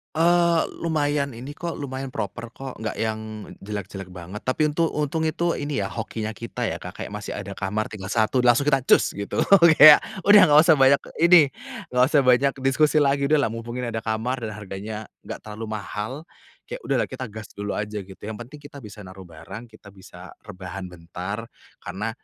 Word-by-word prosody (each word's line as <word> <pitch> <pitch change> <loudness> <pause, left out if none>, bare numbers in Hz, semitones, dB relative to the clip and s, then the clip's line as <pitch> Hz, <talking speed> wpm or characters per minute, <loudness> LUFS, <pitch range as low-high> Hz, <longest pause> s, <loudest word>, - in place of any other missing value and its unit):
Eee, 170 0 +4 0.2
lumayan 145 -5 -1
ini 130 +5 -8
kok, 170 +2 -5
lumayan 135 -1 -5
proper 120 -2 -5
kok 135 -3 -8
nggak 110 -1 -4
yang 110 -1 -4
jelek-jelek 100 -2 -6
banget. 90 +3 -9
Tapi 150 +3 +1
untuk 165 +2 +1
untung 155 +2 -1
itu 170 +2 -1
ini 145 0 -2
ya - - -5
hokinya 110 -1 -4
kita 115 +2 -6
ya - - -5
Kak, - - -8
kayak - - -8
masih - - -6
ada - - -6
kamar 105 +3 -3
tinggal 95 -3 -7
1 110 +4 +1
langsung 125 +2 +4
kita 140 -2 +3
cus - - +4
gitu, 100 0 -2 0.3
kayak 150 0 +10 0.2
udah 205 0 +8
nggak 150 0 +7
usah 160 -4 +4
banyak 135 +1 +5 0.2
ini, 170 -5 +6 0.4
nggak 125 0 +4
usah 145 -3 +3
banyak 130 +2 +4
diskusi 150 +3 +2
lagi, 140 0 +1
udahlah 145 -7 +2
mumpung 115 +1 -6
ini 125 -2 -3
ada 110 - -2
kamar 110 +4 -2
dan 110 -3 -5
harganya 105 +1 -7 0.2
nggak - - -7
terlalu 110 +1 -7
mahal. 110 +8 -5 0.4
Kayak - - -7
udahlah - - +1
kita 130 - -5
gas 110 0 -10
dulu 100 0 -4
aja 105 0 -4
gitu, 95 0 -13
yang 110 0 -6
penting 130 +5 -10
kita 145 -1 -12
bisa 105 -1 -11
naruh 95 +1 -11
barang, 85 +9 -10
kita 110 -2 -16
bisa 95 -1 -13
rebahan 95 -2 -8
bentar, 90 +6 -7 0.3
karena 100 +5 -5
115 Hz, 190 wpm, -24 LUFS, 105-145 Hz, 0.4 s, kayak